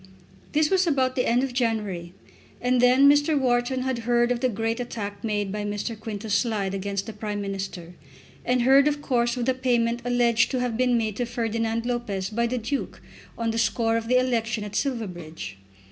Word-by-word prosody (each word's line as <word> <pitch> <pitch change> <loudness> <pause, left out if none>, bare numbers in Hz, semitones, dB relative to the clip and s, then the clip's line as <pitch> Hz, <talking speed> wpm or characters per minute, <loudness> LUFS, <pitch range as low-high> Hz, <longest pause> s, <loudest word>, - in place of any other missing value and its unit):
This 305 0 +2
was 375 -2 +3
about 260 -4 +1
the 250 - +1
end 245 +2 +3
of 270 -2 -2
January, 210 -8 -1 0.5
and 250 0 +2
then 255 +3 +6
Mr. 290 +1 +4
Wharton 255 0 +1
heard 240 -1 +1
of 245 - 0
the 255 +1 +1
great 225 +1 -2
attack 210 -4 -5
made 205 -3 -1
by 210 +1 -3
Mr. 205 +3 -3
Quintus 215 -1 -5
Slide 205 -2 0
against 195 0 -3
the 220 - -7
Prime 210 -1 -4
Minister, 195 -3 -5 0.5
and 250 -1 +1
heard, 270 +3 +6
of 290 -1 -1
course, 240 -2 +1
of 240 - -1
the 260 - +2
payment 240 -2 +1
alleged 240 -2 +2
to 260 - -1
have 245 -2 -1
been 250 0 +2
made 215 -3 -2
to 245 - -1
Ferdinand 230 -1 -1
Lopez 215 -6 -2
by 235 +2 +1
the 250 +2 -2
Duke 255 +4 -3 0.4
on 230 -1 -1
the 225 - -1
score 225 +1 +1
of 225 0 -2
the 255 +2 +4
election 230 -3 0
at 210 0 -7
Silverbridge. 175 - -4
235 Hz, 190 wpm, -25 LUFS, 210-250 Hz, 0.5 s, then